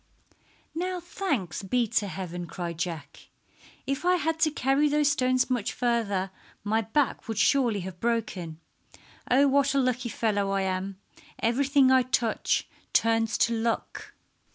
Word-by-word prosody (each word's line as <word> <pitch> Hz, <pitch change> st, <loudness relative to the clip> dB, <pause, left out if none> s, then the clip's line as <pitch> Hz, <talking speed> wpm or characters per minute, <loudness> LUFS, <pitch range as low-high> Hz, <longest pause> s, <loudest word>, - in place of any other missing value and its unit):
"Now 360 Hz, +2 st, -2 dB
thanks 295 Hz, -, -3 dB
be 235 Hz, +5 st, +1 dB
to 205 Hz, -, +1 dB
heaven!" 175 Hz, -1 st, -5 dB
cried 170 Hz, -1 st, -5 dB
Jack. 160 Hz, -5 st, -5 dB, 0.6 s
"If 275 Hz, +3 st, -2 dB
I 360 Hz, +1 st, +4 dB
had 360 Hz, -, +1 dB
had 320 Hz, 0 st, -1 dB
to 315 Hz, -, +4 dB
carry 285 Hz, +1 st, +2 dB
those 295 Hz, 0 st, +3 dB
stones 255 Hz, -2 st, +2 dB
much 245 Hz, -5 st, -1 dB
farther 210 Hz, -6 st, 0 dB, 0.3 s
my 220 Hz, +2 st, +1 dB
back 245 Hz, +6 st, -1 dB
would 225 Hz, -2 st, -4 dB
surely 235 Hz, -4 st, +3 dB
have 180 Hz, -1 st, -8 dB
broken. 195 Hz, -8 st, -2 dB, 0.7 s
Oh, 275 Hz, +3 st, +5 dB
what 280 Hz, 0 st, +2 dB
a -, -, +4 dB
lucky 250 Hz, -2 st, 0 dB
fellow 205 Hz, -3 st, 0 dB
I 195 Hz, 0 st, 0 dB
am! 190 Hz, 0 st, -2 dB, 0.4 s
Everything 265 Hz, +3 st, +3 dB
I 260 Hz, 0 st, +6 dB
touch 240 Hz, -2 st, 0 dB, 0.3 s
turns 225 Hz, 0 st, +2 dB
to 235 Hz, -, -2 dB
luck." 230 Hz, 0 st, -3 dB
235 Hz, 150 wpm, -27 LUFS, 195-275 Hz, 0.7 s, I